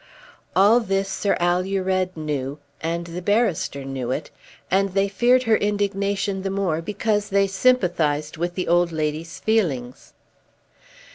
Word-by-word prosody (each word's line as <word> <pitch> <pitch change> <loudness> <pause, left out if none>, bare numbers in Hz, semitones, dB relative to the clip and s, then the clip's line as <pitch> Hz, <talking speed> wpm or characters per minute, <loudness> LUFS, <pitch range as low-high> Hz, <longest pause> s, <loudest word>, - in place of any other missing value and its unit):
All 205 +5 +6
this 195 -3 -1
Sir 195 +1 0
Alured 185 +1 0
knew 145 -3 -3 0.2
and 170 +1 -2
the 170 +1 -6
barrister 195 - 0
knew 135 -3 -4
it, 145 +4 -3 0.4
and 195 0 +2
they 195 0 +3
feared 245 +6 +3
her 225 -2 +3
indignation 200 -1 -1
the 195 - -2
more 190 -5 -1
because 210 +3 -1
they 200 0 +3
sympathised 175 -9 +1
with 175 +2 -3
the 185 - -2
old 175 0 +3
lady's 155 +1 -3
feelings. 145 - -1
185 Hz, 135 wpm, -23 LUFS, 165-200 Hz, 0.4 s, All